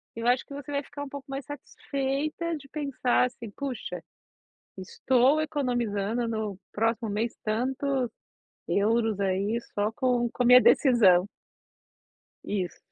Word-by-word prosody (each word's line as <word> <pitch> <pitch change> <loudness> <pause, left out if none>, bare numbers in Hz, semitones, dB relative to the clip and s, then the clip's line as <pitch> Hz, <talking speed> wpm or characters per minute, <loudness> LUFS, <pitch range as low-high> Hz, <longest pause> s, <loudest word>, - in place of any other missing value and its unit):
eu 230 0 -5
acho 245 +1 +3
que - - -12
você 285 0 -7
vai 280 0 0
ficar 285 +1 -8
um 285 - -7
pouco 280 0 -9
mais 275 0 -5
satisfeita 290 +3 -3
de 275 - -14
pensar, 275 -4 +1
assim: 240 -2 -7
"Puxa, 270 +2 -5 0.8
estou 260 +9 +2
economizando 240 -7 -1
no 215 -4 -3
próximo 225 +1 0
mês 220 +3 -2
tantos 255 +3 -1 0.6
euros 220 0 +1
aí 200 +4 0
só 205 +2 0
com 245 -2 +1
com 250 - -2
a - - +2
minha 250 +1 +9
decisão." 205 -11 +5 1.2
Isso. 185 -4 -3
245 Hz, 135 wpm, -27 LUFS, 220-275 Hz, 1.2 s, minha